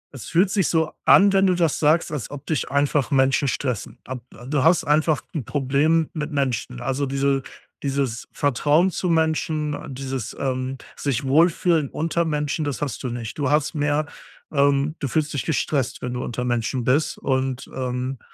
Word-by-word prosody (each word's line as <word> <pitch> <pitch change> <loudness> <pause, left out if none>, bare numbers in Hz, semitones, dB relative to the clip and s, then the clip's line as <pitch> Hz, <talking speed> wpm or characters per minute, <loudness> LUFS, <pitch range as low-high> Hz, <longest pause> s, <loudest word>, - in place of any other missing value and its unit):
Es 130 - -8
fühlt 180 +3 +3
sich 195 -5 +2
so 160 -2 +1
an, 200 0 +7
wenn 195 0 +4
du 185 - +3
das 170 -3 +1
sagst, 155 +2 +3
als 145 -7 -4
ob 145 0 -9
dich 155 -5 -1
einfach 140 -1 +1
Menschen 135 +1 +3
stressen. 125 -4 -3
Ab 125 -1 -6 0.3
du 140 -1 +1
hast 165 +2 +4
einfach 155 0 +2
'n 150 -6 -2
Problem 145 +5 +1
mit 150 0 -4
Menschen, 125 -3 -2
also, 135 +3 -1
diese 135 0 +1 0.4
dieses 135 -4 -2
Vertrauen 145 +6 +2
zu 180 0 -2
Menschen, 160 -2 +1 0.2
dieses, 130 -3 -5
ähm, 130 0 -2 0.2
sich 140 -1 -2
wohlfühlen 160 +1 +3
unter 165 +2 -1
Menschen, 150 0 -1
das 145 -1 -3
hast 140 -5 -3
du 125 - -2
nicht. 120 +1 -6
Du 140 -2 +1
hast 150 +1 +2
mehr 145 0 +1 0.5
ähm, 140 +1 +2
du 140 - -2
fühlst 150 +4 -1
dich 140 - -2
gestresst, 135 -4 -1
wenn 125 - -3
du 125 - -3
unter 125 +1 -3
Menschen 120 +1 -1
bist, 140 +6 +1
und, 130 0 -1
ähm, 130 0 -3
140 Hz, 175 wpm, -23 LUFS, 130-155 Hz, 0.5 s, an